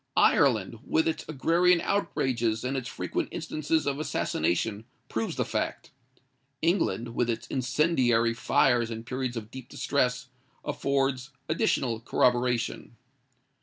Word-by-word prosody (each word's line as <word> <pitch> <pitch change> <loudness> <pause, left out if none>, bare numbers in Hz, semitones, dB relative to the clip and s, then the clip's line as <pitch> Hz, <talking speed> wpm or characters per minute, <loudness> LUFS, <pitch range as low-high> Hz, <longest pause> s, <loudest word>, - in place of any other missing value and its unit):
Ireland, - - +3
with 325 +1 +1
its 325 - -2
agrarian 170 +4 +3
outrages 120 - 0
and 130 +2 -2
its 130 -2 -3
frequent - - -3
instances 155 +1 -1
of 140 0 -1
assassination, 105 - -1 0.2
proves 110 0 -2
the - - 0
fact. - - -3 0.7
England, 165 - +1
with 120 0 0
its 115 -1 -2
incendiary 125 -4 +2
fires 120 -1 +2
in 115 -1 -5
periods 130 0 -3
of 110 0 -7
deep 130 0 -9
distress, 130 -1 0 0.4
affords 135 -1 0 0.2
additional 140 - +1
corroboration. 120 0 0
125 Hz, 120 wpm, -28 LUFS, 115-145 Hz, 0.7 s, Ireland